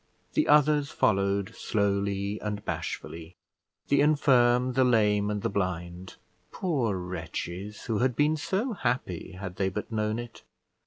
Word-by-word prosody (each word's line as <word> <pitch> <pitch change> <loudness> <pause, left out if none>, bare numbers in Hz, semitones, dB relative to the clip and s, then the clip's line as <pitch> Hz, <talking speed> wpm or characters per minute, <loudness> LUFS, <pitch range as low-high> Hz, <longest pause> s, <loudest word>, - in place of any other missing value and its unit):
The 310 - +2
others 150 -1 +4
followed 100 -1 +1
slowly 100 0 -1
and 105 -1 -4
bashfully; 85 +2 -5 0.5
the 140 0 +4
infirm, 125 -4 +4
the 130 +1 +3
lame, 105 -4 +3
and 105 -1 -2
the - - +2
blind: 90 -1 -3 0.3
poor 130 - -1
wretches! 90 +2 -5
who 110 -3 -1
had 125 -1 +1
been 150 +5 +3
so 195 - -1
happy, 120 - -2
had 95 -1 -7
they 95 -1 +1
but 105 +4 -5
known 110 0 -1
it! 120 -1 -8
105 Hz, 140 wpm, -28 LUFS, 100-130 Hz, 0.5 s, others